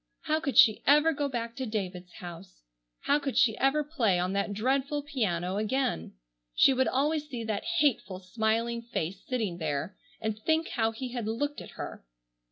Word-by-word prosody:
How 310 0 0
could 275 -7 -2
she 220 -2 +7
ever 300 +3 +6
go 285 -1 -1
back 235 -2 -4
to 260 - -2
David's 185 -4 -4
house! 175 - -10 0.4
How 290 - +2
could 275 -2 -3
she 220 -3 +4
ever 275 +3 +3
play 250 - +1
on 180 +2 0
that 200 +1 0
dreadful 270 +7 0
piano 195 - -1
again? 215 - -1 0.4
She 270 - +6
would 260 0 +2
always 300 +3 0
see 245 -4 -4
that 215 -2 -2
hateful, 240 - +1
smiling 225 +4 -1
face 195 -5 -4
sitting 215 -9 -2
there 155 +3 -2 0.2
and 220 -1 -3
think 320 +7 +1
how 225 -3 +1
he 250 +3 -5
had 240 -3 -3
looked 290 +7 -2
at - - -12
her. - - -6
230 Hz, 175 wpm, -29 LUFS, 200-275 Hz, 0.4 s, she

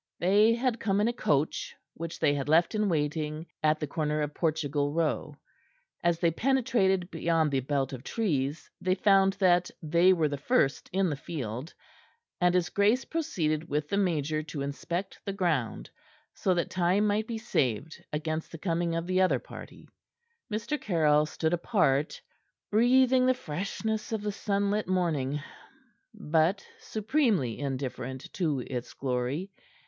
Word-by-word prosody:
They 210 +5 +4
had 240 -1 0
come 200 -1 +1
in 210 - +3
a 240 - 0
coach, 150 -9 0 0.2
which 165 0 -6
they 145 - +3
had 145 0 -3
left 165 +2 +4
in 210 -1 +1
waiting 155 0 -1 0.2
at 155 0 +2
the 150 - -2
corner 150 +1 -1
of 145 0 -4
Portugal 145 -3 0
Row. 155 -2 -1 0.7
As 170 -1 +2
they 170 0 +2
penetrated 215 - +1
beyond 165 -2 +1
the 135 - +2
belt 135 0 -1
of 130 -1 -7
trees 150 - -1
they 185 0 +2
found 195 0 +4
that 180 -2 +3
they 170 +4 +4
were 165 -4 +3
the 145 -1 -4
first 145 - +1
in 190 +1 +2
the - - -1
field, 135 -2 -5 0.7
and 180 0 +3
his 180 -1 +2
grace 210 +6 +2
proceeded 165 - -1
with 150 0 -1
the 200 - 0
major 155 -6 0
to 150 -2 -5
inspect 170 +7 -4
the 200 - -3
ground, 165 - -1 0.4
so 185 -3 +1
that 170 - -1
time 185 +3 +2
might 210 +1 +1
be 230 - -3
saved 140 - -1
against 155 +1 -3
the 165 - -7
coming 170 0 -1
of 165 0 -2
the 185 +1 +1
other 185 - +3
party. - - -11 0.6
Mr. 225 +8 -2
Caryll 155 -5 +3
stood 160 +1 -1
apart, 160 - +1 0.5
breathing 255 +3 +4
the 255 - +4
freshness 215 +3 -3
of 220 -2 -2
the 210 - -1
sunlit 200 0 -1
morning, 155 -7 0 0.7
but 175 -2 +1
supremely 215 - 0
indifferent 130 -1 -4
to 155 -8 0
its 125 -1 -6
glory. 135 +8 -2
170 Hz, 155 wpm, -29 LUFS, 150-200 Hz, 0.7 s, They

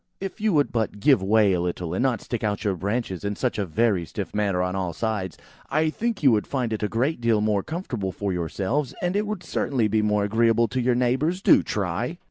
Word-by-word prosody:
"If 195 +1 -6
you 215 0 +2
would 145 -2 +2
but 110 -3 -2
give 135 -2 +4
way 105 0 +4
a 90 - 0
little, 90 -1 -3
and 95 - -1
not 130 -3 +1
stick 120 -2 -4
out 105 -1 -1
your 100 -3 0
branches 100 0 -3
in 100 0 -2
such 125 -1 -1
a 100 - -1
very 100 0 +1
stiff - - -6
manner 100 -4 +1
on 90 +1 -2
all 90 -3 -2
sides, 100 -3 -3 0.3
I 155 +2 +1
think 230 0 -3
you 135 - +7
would 105 -2 +1
find 125 -5 -1
it 110 - -3
a 105 - +1
great 125 +6 -1
deal 115 -2 +3
more 105 -1 +1
comfortable 125 - -4
for 100 0 -3
yourselves, 105 - -2
and 175 +2 0
it 210 +1 0
would 210 -3 -4
certainly 125 -6 0
be 110 +1 +1
more 105 -1 +1
agreeable 115 +2 +3
to 130 - -1
your 125 0 +2
neighbours. 130 +9 0
Do - - +6
try!" 105 - -2
110 Hz, 235 wpm, -24 LUFS, 100-130 Hz, 0.3 s, you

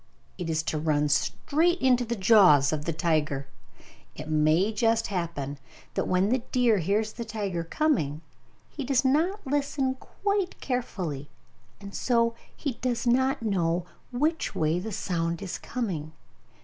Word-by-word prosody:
It 175 -2 -3
is 160 0 0
to 155 - -2
run 150 -1 +1
straight 330 - +1
into 250 -2 +3
the 235 +1 -2
jaws 185 -9 +6
of 150 -1 -3
the 170 - 0
tiger! 155 -4 0 0.7
It 150 - -7
may 155 +7 +3
just 225 +1 +2
happen 145 -6 -3 0.3
that - - -1
when 185 +2 +2
the 255 +3 +2
deer 240 -5 +3
hears 210 +5 0
the 235 - -5
tiger 205 -6 -3
coming, 165 - 0 0.5
he 290 - -6
does 265 0 +1
not 330 +10 +1
listen 275 -1 0
quite 400 -2 -2
carefully, 180 - -3 0.5
and 200 0 -10
so 230 -2 +2 0.2
he 270 -7 -4
does 245 -1 -1
not 260 +1 +2
know 175 -4 0 0.3
which 305 +6 0
way 160 +2 +1
the 220 +4 -5
sound 170 -3 -2
is 190 - -5
coming. 175 -11 -4
205 Hz, 150 wpm, -27 LUFS, 160-255 Hz, 0.7 s, jaws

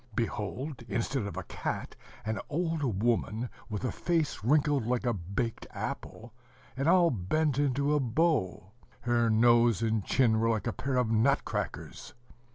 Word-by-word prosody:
Behold, 120 +5 -3
instead 115 +1 -1
of - - -7
a - - -3
cat, - - -4 0.3
an 110 0 -2
old 150 - -1
woman 115 0 0 0.2
with 105 +3 -3
a - - 0
face 165 -9 -1
wrinkled 145 +1 +3
like 125 0 0
a 120 - +2
baked 100 +5 -3
apple, 115 0 -6 0.4
and 135 +3 -1
all 175 -1 +5
bent 135 - 0
into 140 +1 +1
a 150 - +3
bow: 120 - 0 0.3
her 120 -1 +2
nose 115 -1 +4
and 110 -2 +1
chin 115 -2 +3
were 115 +1 +2
like 110 -4 0
a - - -1
pair 130 0 -2
of 125 -3 +1
nut 110 +1 +3
crackers. - - -5
120 Hz, 160 wpm, -30 LUFS, 110-140 Hz, 0.4 s, all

